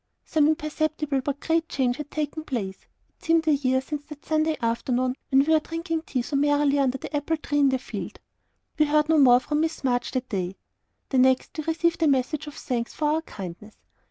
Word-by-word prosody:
Some 300 Hz, -2 st, +3 dB
imperceptible 305 Hz, -2 st, -1 dB
but 285 Hz, +1 st, -3 dB
great 325 Hz, 0 st, 0 dB
change 250 Hz, -2 st, 0 dB
had 300 Hz, -1 st, -6 dB
taken 305 Hz, +1 st, -3 dB
place. 205 Hz, -10 st, -5 dB, 0.2 s
It -, -, -30 dB
seemed 330 Hz, -1 st, +2 dB
a 310 Hz, -, +5 dB
year 260 Hz, -2 st, +1 dB
since 290 Hz, +2 st, -5 dB
that 300 Hz, -1 st, -12 dB
Saturday 310 Hz, 0 st, +1 dB
afternoon, 250 Hz, +2 st, 0 dB
when 270 Hz, +1 st, +4 dB
we 320 Hz, -, +3 dB
were 315 Hz, -, +5 dB
drinking 330 Hz, +1 st, -3 dB
tea 255 Hz, -3 st, -1 dB
so 280 Hz, -, -4 dB
merrily 290 Hz, 0 st, +3 dB
under 270 Hz, -1 st, +1 dB
the 295 Hz, -, -6 dB
apple 290 Hz, +3 st, 0 dB
tree 290 Hz, -1 st, -1 dB
in 280 Hz, -1 st, +5 dB
the 260 Hz, -, +1 dB
field. 255 Hz, -, -7 dB, 0.6 s
We 305 Hz, -, +5 dB
heard 300 Hz, +1 st, +2 dB
no 320 Hz, -1 st, +5 dB
more 250 Hz, -3 st, +7 dB
from 295 Hz, +3 st, -2 dB
Miss 320 Hz, -2 st, -2 dB
March 245 Hz, -2 st, 0 dB
that 255 Hz, -1 st, -2 dB
day. 185 Hz, -2 st, -2 dB, 0.5 s
The 265 Hz, -, +2 dB
next, 260 Hz, 0 st, +3 dB
we 310 Hz, -2 st, -4 dB
received 335 Hz, +1 st, 0 dB
a 320 Hz, -, +4 dB
message 280 Hz, +2 st, 0 dB
of 295 Hz, -, -8 dB
thanks 235 Hz, -3 st, -3 dB
for 300 Hz, -1 st, 0 dB
our 315 Hz, +1 st, +1 dB
"kindness." 200 Hz, -, -9 dB
290 Hz, 215 wpm, -25 LUFS, 255-310 Hz, 0.6 s, more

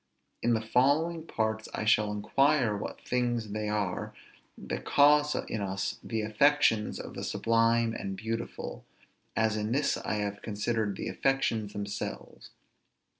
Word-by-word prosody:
In 120 Hz, 0 st, +3 dB
the 110 Hz, -, 0 dB
following 155 Hz, +8 st, +2 dB
parts 110 Hz, -1 st, -2 dB
I -, -, -3 dB
shall 105 Hz, -1 st, +3 dB
inquire 115 Hz, +3 st, +2 dB
what 100 Hz, -, -6 dB
things 120 Hz, -3 st, 0 dB
they 105 Hz, 0 st, -2 dB
are 100 Hz, -3 st, -2 dB, 0.4 s
that -, -, -5 dB
cause 150 Hz, +1 st, +5 dB
in 110 Hz, -, -3 dB
us 95 Hz, -1 st, -2 dB
the 110 Hz, -2 st, -2 dB
affections 110 Hz, 0 st, +3 dB
of -, -, -7 dB
the -, -, -6 dB
sublime 115 Hz, 0 st, +2 dB
and 95 Hz, -3 st, -4 dB
beautiful, 110 Hz, -, -5 dB, 0.5 s
as 110 Hz, -1 st, +2 dB
in 105 Hz, +1 st, -2 dB
this 140 Hz, +1 st, +1 dB
I -, -, -2 dB
have 100 Hz, -1 st, -3 dB
considered 105 Hz, -1 st, -1 dB
the -, -, -4 dB
affections 115 Hz, -6 st, 0 dB
themselves. 100 Hz, 0 st, -6 dB
110 Hz, 140 wpm, -29 LUFS, 105-125 Hz, 0.5 s, cause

